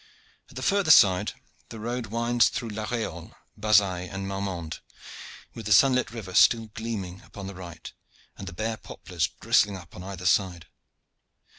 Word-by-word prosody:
At - - -17
the - - -5
further 200 -4 +2
side 95 -11 +6 0.4
the 115 - -8
road 120 +1 -3
winds 115 +2 +2
through 120 -3 -4
La 105 0 -4
Reolle, 110 -9 -4 0.2
Bazaille, 100 -4 +2
and 95 0 -5
Marmande, 95 -5 -4 0.7
with 110 -2 -7
the - - -3
sunlit 130 +1 +4
river 110 -5 -8
still 115 +2 +4
gleaming 100 -5 -5
upon 100 - -10
the 100 - -6
right, 90 -3 -10 0.4
and 95 - -9
the - - -5
bare 110 +4 -3
poplars 85 -5 -3
bristling 105 -3 +1
up 85 -2 -14
upon - - -9
either 95 -1 -7
side. 90 -3 +1
100 Hz, 160 wpm, -26 LUFS, 90-115 Hz, 0.7 s, side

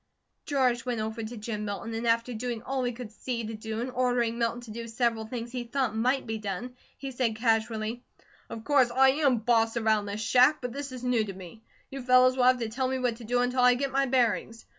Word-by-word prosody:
George 255 -4 +1
went 245 -3 -2
over 220 +1 -3
to 225 +2 -6
Jim 210 0 -4
Milton, 205 +2 -5
and 230 +1 -3
after 230 +2 +1
doing 235 0 -4
all 265 -1 -2
he 245 - 0
could 235 -2 -8
see 235 0 -4
to 225 - -5
do 220 +1 -5
and 255 +1 -3
ordering 245 -2 0
Milton 230 +1 -1
to 235 -3 -10
do 230 +1 -6
several 230 -1 -1
things 235 0 -5
he 250 -1 -3
thought 240 -2 -1
might 255 +4 +1
be 220 -1 -4
done, 210 +5 -5 0.2
he 275 -1 -6
said 245 -3 -1
casually: 225 +1 0 0.5
"Of 225 - -7
course 275 -3 +4
I 265 +2 +5
am 275 -2 +2
BOSS 225 0 +2
around 220 -2 +1
this 200 +1 -4
shack, 255 +7 +4
but 245 -2 -5
this 280 0 -5
is 255 -1 -8
new 250 -3 +2
to 195 - -6
me. 185 +3 -11 0.3
You 270 0 -5
fellows 255 0 +5
will 255 -1 +2
have 255 0 +5
to 230 -2 -3
tell 260 +3 -1
me 260 0 -1
what 245 -3 -1
to 235 - -10
do 245 +2 +1
until 250 +1 0
I 250 0 +6
get 275 +1 -2
my 275 +1 +1
bearings. 235 -2 0
240 Hz, 240 wpm, -28 LUFS, 225-255 Hz, 0.5 s, I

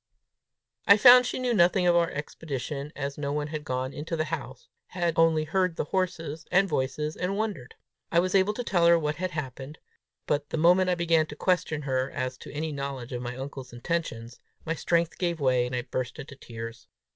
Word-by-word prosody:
I 200 - +8
found 250 +2 +8
she - - -3
knew 250 -1 0
nothing 180 -1 +4
of 175 -1 +4
our 170 0 +3
expedition, 145 -2 -5
as 140 0 -4
no 140 -1 -2
one 150 0 -2
had 155 -1 -5
gone 130 -1 -3
into 155 +3 -4
the 155 - 0
house 135 -5 -6 0.2
had 175 -2 -1
only 165 -1 +4
heard 185 +2 0
the - - -1
horses 165 -2 -2
and 195 +2 +4
voices, 150 0 -2
and 190 +2 -2
wondered. 200 - -4 0.4
I 170 - +4
was 185 +1 0
able 195 +2 +3
to 245 - -3
tell 175 -6 +2
her 170 0 +7
what 150 -2 -2
had 185 +1 -2
happened; 145 -2 -6 0.5
but 145 0 -1
the - - -3
moment 180 +3 +4
I 180 - +2
began 165 -2 +2
to 150 - -8
question 175 -3 0
her 130 -1 0
as 130 -2 -3
to - - -10
any 155 +2 -3
knowledge 140 -3 -5
of 120 - -3
my 125 0 -5
uncle's 135 -2 -7
intentions, 120 -4 -4 0.3
my 165 - 0
strength 170 +1 0
gave 170 -2 -1
way, 125 -3 +2
and 125 - -4
I 125 - -2
burst 125 0 -4
into 140 0 -9
tears. 115 -2 -9
155 Hz, 205 wpm, -27 LUFS, 135-175 Hz, 0.5 s, I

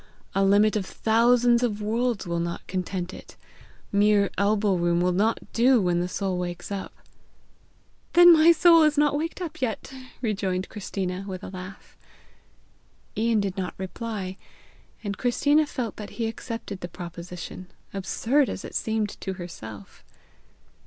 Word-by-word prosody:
A 195 - +2
limit 205 +2 +4
of 210 - 0
thousands 235 +3 +3
of 220 -4 0
worlds 230 +1 -1
will 170 -1 -2
not 170 0 -4
content 185 -1 -3
it. - - -12 0.6
Mere 205 0 +3
elbow 205 0 +2
room 175 -1 +1
will 180 +1 +2
not 210 +5 +1
do 245 +2 +5
when 175 -3 +1
the 175 - -1
soul 185 -1 -2
wakes 175 +1 -5
up!" 195 -1 -4 1.2
"Then 350 0 +9
my 320 +1 +7
soul 335 0 +6
is 305 -1 +3
not 295 -1 +3
waked 325 +5 -3
up 335 -2 -7
yet!" 255 +2 -3 0.3
rejoined 195 -5 -2
Christina 190 -2 -4
with 190 0 -6
a - - -6
laugh. 185 +1 -10 1.2
Ian 225 -1 +2
did 195 -1 -3
not 185 -1 -3
reply, 190 0 -5 0.7
and 200 -1 -4
Christina 290 +5 +3
felt 235 -7 -4
that 210 - -7
he 230 - 0
accepted 225 -3 -5
the 175 - -5
proposition, 175 +1 -8 0.3
absurd 235 +8 +1
as - - -5
it - - -9
seemed 220 -1 -1
to 190 - -3
herself. 110 - -10
205 Hz, 150 wpm, -25 LUFS, 185-235 Hz, 1.2 s, Then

